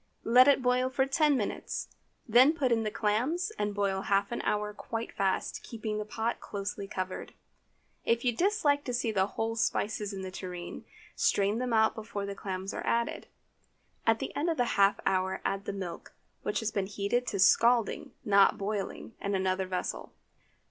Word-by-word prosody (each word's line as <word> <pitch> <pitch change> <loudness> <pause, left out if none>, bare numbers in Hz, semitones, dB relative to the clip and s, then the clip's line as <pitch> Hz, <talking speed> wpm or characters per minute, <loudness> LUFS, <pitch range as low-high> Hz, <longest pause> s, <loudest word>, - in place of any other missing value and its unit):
Let 250 +3 +6
it 275 -2 +4
boil 250 +1 +2
for 265 +1 +1
ten 290 +1 +3
minutes, 210 - -3 0.4
then 250 +6 +6
put 275 -6 0
in 230 -1 +3
the 215 - -1
clams 240 - 0
and 205 -1 -1
boil 195 -1 0
half 200 +1 +1
an 235 - -2
hour 210 0 -1
quite 225 +2 -5
fast, 195 -1 -1
keeping 220 -2 -4
the 210 - -3
pot 225 +2 -2
closely 200 0 -5
covered. 185 -1 -5 0.7
If 235 +2 +1
you 240 -2 +2
dislike 315 - +2
to 250 -3 -2
see 235 -2 0
the 190 -2 +2
whole 225 +2 -2
spices 215 -2 -1
in 195 -1 -6
the 185 - -5
tureen, 180 -2 -7 0.3
strain 205 +3 +2
them 250 -1 -2
out 220 -1 +4
before 215 -2 -5
the 200 - -4
clams 190 -1 -5
are - - -4
added. 235 0 -1 0.8
At 225 0 +5
the - - -5
end 310 +4 0
of 330 - 0
the 245 - +2
half 200 0 +4
hour 190 0 +1
add 195 +1 -1
the - - -2
milk, 185 -4 -7 0.3
which - - -1
has 220 -1 -1
been 200 -3 -1
heated 210 +5 -1
to 200 - -2
scalding, 230 +4 +3
not 200 -1 +5
boiling, 205 +2 -4
in 200 0 -1
another 190 0 0
vessel. 185 -1 -4
215 Hz, 185 wpm, -30 LUFS, 195-240 Hz, 0.8 s, Let